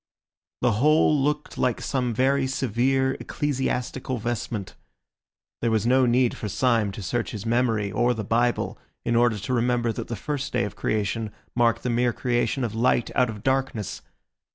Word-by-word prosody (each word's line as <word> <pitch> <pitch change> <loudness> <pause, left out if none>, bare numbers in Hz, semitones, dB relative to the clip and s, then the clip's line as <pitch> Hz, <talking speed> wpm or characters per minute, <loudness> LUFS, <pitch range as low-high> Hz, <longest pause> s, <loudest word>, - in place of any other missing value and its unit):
The - - +4
whole 150 +7 +4
looked 150 +1 -1
like 125 -3 +1
some 125 -3 -1
very 130 +3 +2
severe 130 +1 +1
ecclesiastical 130 -2 -2
vestment. 115 -3 -3 0.9
There 115 - +1
was 110 -1 +1
no 130 +1 +4
need 120 0 +3
for 105 - -5
Syme 115 -2 +2
to 100 - -7
search 120 +6 -1
his 105 0 -6
memory 115 -3 +1
or 120 0 +2
the 110 - -3
Bible 120 +3 0 0.3
in 120 - +1
order 120 -2 +3
to 105 +6 -3
remember 120 -1 +1
that - - -5
the 115 - -3
first 140 +7 -4
day 125 -1 +2
of 105 0 -4
creation 110 +1 -1 0.2
marked 120 -2 +2
the 125 - 0
mere 120 0 +2
creation 125 +2 0
of 115 -3 -2
light 120 +1 +1
out 125 -2 +3
of 105 -2 -7
darkness. 130 -5 -1
120 Hz, 170 wpm, -25 LUFS, 110-130 Hz, 0.9 s, The